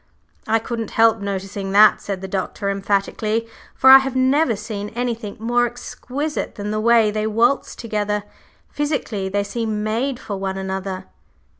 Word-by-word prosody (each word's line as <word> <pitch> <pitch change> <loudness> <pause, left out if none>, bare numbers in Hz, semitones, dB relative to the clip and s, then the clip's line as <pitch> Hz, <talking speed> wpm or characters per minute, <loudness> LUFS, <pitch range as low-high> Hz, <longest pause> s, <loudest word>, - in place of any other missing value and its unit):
"I 220 +1 +3
couldn't 225 -1 -4
help 225 0 +5
noticing 195 0 -4
that," 210 +1 +6
said 195 -2 -4
the 190 - -5
Doctor, 200 +1 -2
emphatically, 205 +3 -1 0.3
"for 265 - +6
I 270 - +11
have 270 -1 -4
never 260 0 +3
seen 210 -1 -5
anything 235 -4 -3
more 240 +2 +2
exquisite 255 +4 -5
than 205 -1 -4
the 215 - -1
way 225 -1 +4
they 215 0 -1
waltz 235 +5 +1
together. 210 -2 -2 0.5
Physically, 270 -10 -2
they 200 +1 0
seem 215 0 -3
made 240 +4 -1
for 205 -6 -5
one 190 0 -3
another." 190 0 -4
215 Hz, 155 wpm, -21 LUFS, 200-240 Hz, 0.5 s, I